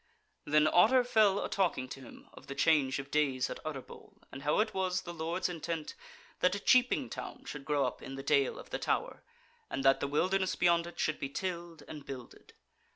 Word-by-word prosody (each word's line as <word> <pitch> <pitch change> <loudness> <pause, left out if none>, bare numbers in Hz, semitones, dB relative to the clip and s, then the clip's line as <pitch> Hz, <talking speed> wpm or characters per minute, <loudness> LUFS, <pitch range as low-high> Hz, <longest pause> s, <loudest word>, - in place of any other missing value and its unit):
Then 150 +1 +4
Otter 225 +11 +5
fell 215 -5 +3
a - - -2
talking 175 -9 0
to - - -7
him 130 - -13
of - - -14
the 140 - -6
change 145 -5 +3
of 135 0 -7
days 135 -4 +1
at - - -7
Utterbol, 145 -4 -8
and 135 - -8
how 150 +1 +1
that 215 - +2
it - - -18
was 185 -1 0
the 175 - -7
Lord's 170 +3 -2
intent 165 -2 -4 0.5
that 180 +1 +3
a - - -3
cheaping 250 +4 +3
town - - -8
should 140 -2 -7
grow 145 -3 +1
up 125 - -4
in 135 - -7
the 135 - -7
Dale 140 -2 +2
of - - -11
the - - -2
Tower, - - -1 0.5
and 135 - -3
that 135 0 +5
the 140 - -1
wilderness 185 +6 +1
beyond 170 -1 +3
it 175 - -11
should 155 - 0
be 140 - -3
tilled 170 -1 -5
and 150 -2 -8
builded. 130 -3 -10
155 Hz, 215 wpm, -32 LUFS, 140-185 Hz, 0.5 s, Otter